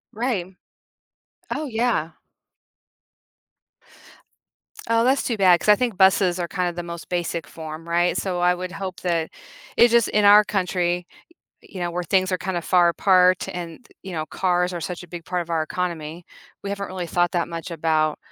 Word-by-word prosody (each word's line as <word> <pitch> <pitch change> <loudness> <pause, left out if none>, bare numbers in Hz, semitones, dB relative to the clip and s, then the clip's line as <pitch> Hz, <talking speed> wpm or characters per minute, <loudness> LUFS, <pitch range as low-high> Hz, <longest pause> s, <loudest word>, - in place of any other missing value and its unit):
Right. 205 -6 -2 1.0
Oh 310 - -3
yeah. 225 - 0 2.8
Oh, 230 0 +4
that's 265 +2 +3
too 235 - -2
bad 180 -3 +5
'cause - - -5
I 210 - +7
think 240 -6 -1
buses 190 -1 +4
are 175 - -2
kind 180 -2 -1
of 175 - -6
the 175 - -3
most 170 0 -8
basic 170 -3 -2
form, 160 +1 -9
right? 175 +1 +1
So 180 -2 -2
I 180 0 +3
would 180 0 -6
hope 190 -2 -6
that 170 -3 -1 0.5
it's 240 - +7
just 235 -2 +4
in 210 0 +1
our 210 +1 +8
country, 180 -3 -1 0.6
you 190 - -11
know, 175 0 -1
where 180 - -2
things 185 +2 +1
are 180 - 0
kind 180 +1 -3
of 170 - -3
far 175 -1 +4
apart 185 0 +3
and, 175 +5 -7
th - - -23
you 190 - -8
know, 155 -2 -3
cars 180 -1 0
are 175 - -4
such 180 +2 -5
a - - -16
big 170 0 -8
part 180 -1 -2
of 170 - -13
our 160 -1 +1
economy. 170 0 -4 0.4
We 200 - -3
haven't 200 0 -4
really 185 -2 -5
thought 175 0 +1
that 170 -1 0
much 170 +2 -6
about 155 -1 0
180 Hz, 190 wpm, -23 LUFS, 170-190 Hz, 2.8 s, our